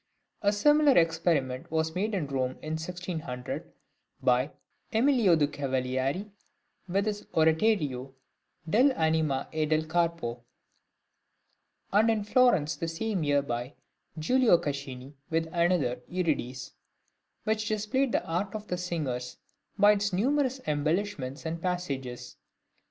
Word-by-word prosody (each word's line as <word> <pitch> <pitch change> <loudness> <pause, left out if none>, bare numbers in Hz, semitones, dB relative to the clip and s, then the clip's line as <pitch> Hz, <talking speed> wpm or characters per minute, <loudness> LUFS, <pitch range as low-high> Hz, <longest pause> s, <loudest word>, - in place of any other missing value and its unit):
A 205 - +3
similar 295 +6 +4
experiment 160 -6 +1
was 160 0 0
made 205 +4 -1
in 175 -6 -1
Rome 130 -2 -2
in 155 - -4
1600 160 -6 -5 0.5
by 125 +2 +2 0.4
Emilio 230 -6 +4
de' 155 -2 +3
Cavalieri 135 +6 -2 0.6
with 195 +3 0
his 210 -1 -3
oratorio 160 - +2 0.6
"Dell' 250 - +4
Anima 160 - +1
e 155 -1 0
del 155 +1 +2
Corpo," 165 -8 -1 1.5
and 215 +3 +5
in 220 -2 +1
Florence 210 - +3
the 165 - -3
same 185 +2 -2
year 145 -1 +2
by 120 +1 -4 0.4
Giulio 230 +5 +4
Caccini 140 -4 -5 0.2
with 165 0 +1
another, 170 -7 +2
"Euridice," 145 -8 -2 0.7
which 215 0 0
displayed 220 +5 0
the - - 0
art 190 +5 -2
of 210 0 -7
the 180 - -1
singers 140 -9 -3 0.4
by 205 0 +7
its 205 0 +1
numerous 265 +7 +1
embellishments 150 -2 -1
and 165 +1 -3
passages. 140 -9 -4
165 Hz, 120 wpm, -29 LUFS, 140-205 Hz, 1.5 s, by